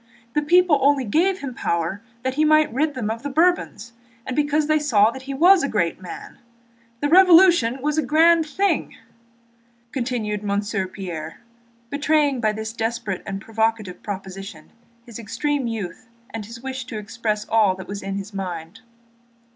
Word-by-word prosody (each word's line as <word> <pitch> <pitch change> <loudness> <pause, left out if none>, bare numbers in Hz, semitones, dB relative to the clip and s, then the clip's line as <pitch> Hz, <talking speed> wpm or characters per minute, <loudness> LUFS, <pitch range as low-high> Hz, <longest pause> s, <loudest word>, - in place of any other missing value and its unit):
The 300 - +2
people 340 0 +4
only 280 0 +3
gave 360 - +1
him 270 -3 -5
power 170 -1 -2 0.2
that 260 0 -1
he 300 +3 +1
might 310 -3 +4
rid 295 +3 0
them 220 -4 -2
of 225 +1 -5
the 285 - -4
Bourbons 305 - 0 0.3
and 260 - -4
because 295 +1 +1
they 310 0 +2
saw 225 -7 +3
that 265 - -9
he 275 +1 -6
was 355 +5 +6
a 280 - -1
great 180 -4 -1
man. 180 - -10 0.6
The 290 - +1
Revolution 340 -7 +5
was 300 +1 +1
a - - +1
grand 320 +4 +4
thing!" 395 +6 -1 1.0
continued 235 -5 -2
Monsieur 200 -1 -2
Pierre, 170 -5 -7 0.5
betraying 290 -2 +1
by 215 -2 +2
this 220 +1 -5
desperate 225 -4 -3
and 195 -1 -4
provocative 220 -4 -2
proposition 195 -4 -8 0.3
his 235 -2 -10
extreme 260 +5 -2
youth 225 0 -6 0.2
and 220 -2 -6
his 235 +1 -10
wish 260 -1 -5
to 225 - -6
express 215 0 -3
all 210 -4 +3
that 185 -1 -10
was 200 0 -6
in 195 0 -4
his 200 +1 -6
mind. 180 +1 -6
235 Hz, 165 wpm, -22 LUFS, 205-295 Hz, 1.0 s, was